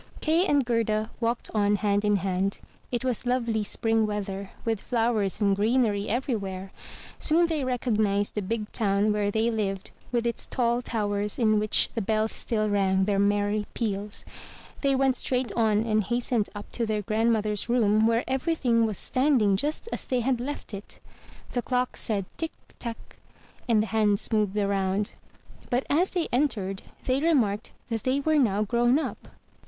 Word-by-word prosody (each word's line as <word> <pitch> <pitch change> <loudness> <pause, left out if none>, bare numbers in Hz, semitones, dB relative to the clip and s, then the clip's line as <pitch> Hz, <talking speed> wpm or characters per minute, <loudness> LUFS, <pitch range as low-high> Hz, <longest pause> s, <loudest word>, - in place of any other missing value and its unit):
Kay 330 +4 +2
and 285 -3 +3
Gerda 225 -2 0
walked 235 0 -1
on 205 -1 +3
hand 205 0 +1
in 210 0 +3
hand. 195 0 -1 0.3
It 245 +1 -2
was 250 -1 -1
lovely 235 -3 +1
spring 225 +1 +1
weather, 200 -2 -4 0.2
with 225 -3 0
flowers 225 -5 0
and 200 -2 +3
greenery 215 -1 +1
everywhere. 200 -6 -2 0.5
Soon 335 +2 +4
they 320 -4 -1
recognized 215 -5 0
the 210 - -2
big 210 +2 -3
town 205 -1 +1
where 205 -1 0
they 220 +3 +1
lived 195 -4 -2 0.2
with 240 -1 0
its 235 - 0
tall 240 -1 +1
towers 205 -3 -1
in 215 -4 +3
which 215 0 +3
the 230 - -1
bells 215 +2 0
still 215 -2 0
rang 190 -2 +2
their 200 -1 +1
merry 205 +1 +1
peals. 205 -2 -2 0.6
They 275 -1 +2
went 265 -1 +2
straight 255 -1 -1
on 220 -1 +2
and 215 -1 +2
hastened 240 0 0
up 205 - -8
to 230 -2 -1
their 210 -1 -1
grandmother's 215 0 0
room, 220 -2 +3
where 230 +1 +2
every 270 +6 0
thing 230 -6 +2
was 210 -4 -3
standing 255 -7 +2
just 295 - -1
as - - -4
they 255 -2 +1
had 250 0 0
left 280 -3 -5
it. 200 +1 -8 0.5
The 245 - -1
clock 250 0 -1
said 200 -4 0
"Tick! 325 -1 -3 0.3
tack!" 235 -2 -8 0.5
and 215 -2 +4
the 225 - -7
hands 210 -1 +2
moved 210 -3 +1
round. 200 0 0 0.6
But 250 +2 0
as 345 +6 +3
they 350 -3 -1
entered, 215 -8 0 0.2
they 260 +2 +1
remarked 240 -10 +1 0.2
that 225 -2 -2
they 260 +4 +1
were 310 +1 +2
now 210 -5 +2
grown 240 +4 +3
up. 315 - -4
220 Hz, 170 wpm, -27 LUFS, 205-245 Hz, 0.6 s, Soon